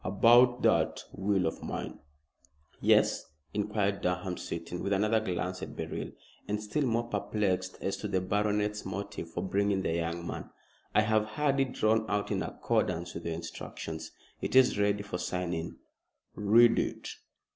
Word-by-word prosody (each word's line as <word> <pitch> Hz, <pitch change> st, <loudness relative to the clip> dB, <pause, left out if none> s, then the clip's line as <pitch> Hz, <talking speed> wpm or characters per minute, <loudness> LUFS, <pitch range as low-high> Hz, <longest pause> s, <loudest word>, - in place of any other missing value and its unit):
"About 120 Hz, +5 st, +5 dB
that -, -, +2 dB
will 95 Hz, -1 st, +1 dB
of 80 Hz, -, -2 dB
mine -, -, -5 dB, 0.4 s
" 70 Hz, -, -31 dB, 0.3 s
"Yes?" -, -, +4 dB, 0.3 s
inquired 105 Hz, -1 st, 0 dB
Durham, 90 Hz, 0 st, -1 dB
sitting, 85 Hz, +1 st, -5 dB
with 100 Hz, -, 0 dB
another 105 Hz, +3 st, +3 dB
glance 90 Hz, -3 st, -3 dB
at -, -, -6 dB
Beryl, -, -, -4 dB, 0.4 s
and 105 Hz, 0 st, -1 dB
still 105 Hz, +8 st, -1 dB
more 115 Hz, 0 st, 0 dB
perplexed 100 Hz, -4 st, -1 dB
as 95 Hz, -, -1 dB
to 105 Hz, -, -4 dB
the 95 Hz, -2 st, +1 dB
baronet's 105 Hz, +2 st, 0 dB
motive 95 Hz, -3 st, -5 dB
for 85 Hz, +2 st, -4 dB
bringing 100 Hz, 0 st, +1 dB
the 80 Hz, -, 0 dB
young 85 Hz, 0 st, -2 dB
man. -, -, -5 dB, 0.5 s
"I 105 Hz, -, +7 dB
have 110 Hz, 0 st, +2 dB
had 140 Hz, +5 st, 0 dB
it 135 Hz, -2 st, +1 dB
drawn 110 Hz, +1 st, +2 dB
out 105 Hz, 0 st, -1 dB
in -, -, 0 dB
accordance 85 Hz, +1 st, -1 dB
with 85 Hz, -, -7 dB
your 85 Hz, -1 st, -2 dB
instructions. 80 Hz, -1 st, -6 dB, 0.3 s
It -, -, -2 dB
is 130 Hz, -5 st, +6 dB
ready 100 Hz, 0 st, +2 dB
for 95 Hz, -3 st, -4 dB
signing." 90 Hz, -2 st, -3 dB, 0.6 s
"Read 115 Hz, +3 st, +5 dB
it." -, -, -3 dB
100 Hz, 160 wpm, -30 LUFS, 90-105 Hz, 0.6 s, I